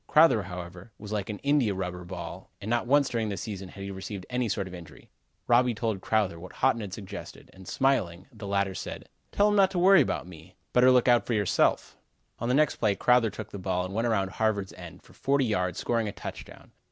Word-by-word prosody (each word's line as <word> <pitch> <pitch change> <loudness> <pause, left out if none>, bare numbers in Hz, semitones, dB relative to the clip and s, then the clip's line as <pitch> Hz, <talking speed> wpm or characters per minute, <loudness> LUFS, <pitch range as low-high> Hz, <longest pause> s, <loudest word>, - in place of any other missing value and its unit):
Crowther, 155 -8 +5
however, 90 +2 -8
was 105 0 -9
like 105 -2 -2
an 105 - -4
India 140 -8 +2
rubber 90 -1 -4
ball 85 - -8
and 100 - -8
not 120 0 +1
once 140 +1 +4
during 115 -4 -1
the 100 - -3
season 100 -4 -6
had 100 - -9
he 100 - -5
received 95 0 -7
any 125 -2 0
sort 100 -1 -2
of 95 - -10
injury. 85 -2 -12 0.3
Robby 120 0 +3
told 110 -3 -2
Crowther 100 -5 0
what 90 +2 -10
Haughton 130 -3 +1
had 100 -3 -6
suggested, 100 0 -9
and 95 -1 -14
smiling, 95 -10 0
the 105 -3 -8
latter 100 -1 0
said: - - -7 0.2
"Tell 205 +1 +3
him 205 - +1
not 195 -2 +5
to 190 - -4
worry 185 0 +7
about 130 - -1
me; 90 0 -14 0.2
better 125 +1 +6
look 125 -1 +4
out 120 -1 +4
for 120 - 0
himself." 100 -3 +1 0.4
On 120 - -2
the 125 - +3
next 150 0 +3
play 105 -3 +1
Crowther 125 +2 +3
took 110 +1 -8
the 100 - -6
ball 90 -1 -1
and 95 - -7
went 115 +3 0
around 100 -4 0
Harvard's 105 -3 -1
end - - -11
for - - -19
forty 140 -1 +1
yards, 90 -5 -1
scoring 115 -2 0
a - - -3
touchdown. - - -10
105 Hz, 225 wpm, -28 LUFS, 95-125 Hz, 0.4 s, worry